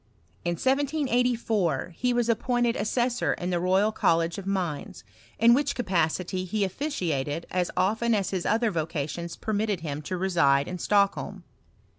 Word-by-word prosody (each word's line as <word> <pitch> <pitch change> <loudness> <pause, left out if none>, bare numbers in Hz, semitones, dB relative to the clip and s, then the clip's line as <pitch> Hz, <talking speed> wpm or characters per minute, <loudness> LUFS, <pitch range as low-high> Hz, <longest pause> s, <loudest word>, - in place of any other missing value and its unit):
In 175 - 0
1784 245 - 0
he 250 +6 0
was 240 -1 +1
appointed 240 +1 +1
assessor 240 +2 0
in 180 +1 -4
the 175 - +1
Royal 190 +4 +2
Col 170 -6 +3
lege 165 +2 -2
of 195 - -8
Mines, 180 -11 -3 0.3
in 235 +1 +6
which 280 +2 +1
capacity 185 -3 0
he 200 +3 -1
officiated 170 - -2
as 180 -1 0
often 220 +4 +2
as 200 -3 -1
his 185 -3 -2
other 225 +1 +2
vocations 165 0 -3
permitted 210 -3 -1
him 150 -2 -4
to 185 +5 -4
reside 145 -7 +2
in 180 0 -5
Stockholm. 200 +2 +1
195 Hz, 150 wpm, -27 LUFS, 170-235 Hz, 0.3 s, in